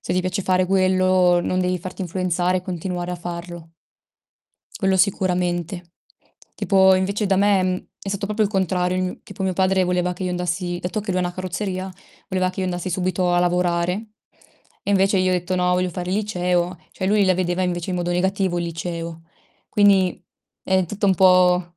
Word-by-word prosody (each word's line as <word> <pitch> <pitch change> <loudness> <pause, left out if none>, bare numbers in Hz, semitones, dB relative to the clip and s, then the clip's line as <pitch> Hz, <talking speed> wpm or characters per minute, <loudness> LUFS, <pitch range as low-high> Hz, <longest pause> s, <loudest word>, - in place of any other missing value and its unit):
Se - - -3
ti 185 - +2
piace 185 +1 -2
fare 185 0 +2
quello, 185 -1 +3
non 185 +1 -1
devi 180 0 0
farti 185 +2 -8
influenzare 180 0 0
e 180 - -9
continuare 180 0 -4
a 180 - -3
farlo. 170 -1 -8 1.1
Quello 190 -2 +2
sicuramente. 180 -2 0 0.6
Tipo 190 -2 +4
invece 200 +3 0
da 195 -1 +2
me, 200 -1 +3
mhmm, 185 0 -2
è 195 - -7
stato 200 +1 -2
proprio 215 +1 0
il 205 - +2
contrario 185 -2 0
il 185 - 0
mio 180 - -4
tipo 195 0 -8
mio 190 -1 0
padre 190 0 +2
voleva 180 0 0
che 185 +1 -6
io 180 - -1
andassi 175 0 -2
dato 180 +4 -3
che 205 -1 -5
lui 185 - 0
ha - - 0
una 175 0 -2
carrozzeria, 185 +1 -4 0.4
voleva 185 -1 0
che 185 - -6
io 185 - 0
andassi 180 0 -3
subito 180 0 0
a 175 - +3
lavorare. 175 0 +1 0.9
E 200 - -3
invece 195 0 +3
io 185 0 +2
ho - - +2
detto: 180 +1 -2
"No, 180 0 +1
voglio 180 0 +1
fare 180 0 -5
il 190 - +1
liceo." 180 -4 -1
Cioè, 185 - -3
lui 205 0 +3
la 185 -1 +3
vedeva 180 0 -1
invece 175 0 -2
in 180 - -1
modo 175 0 -2
negativo 185 0 0
il 170 - -2
liceo. 165 0 -5 0.5
Quindi 195 -4 +3 0.4
è 190 -1 +2
tutto 205 +3 -2
un 190 - +4
po' 180 -1 +4
185 Hz, 200 wpm, -22 LUFS, 175-190 Hz, 1.1 s, Tipo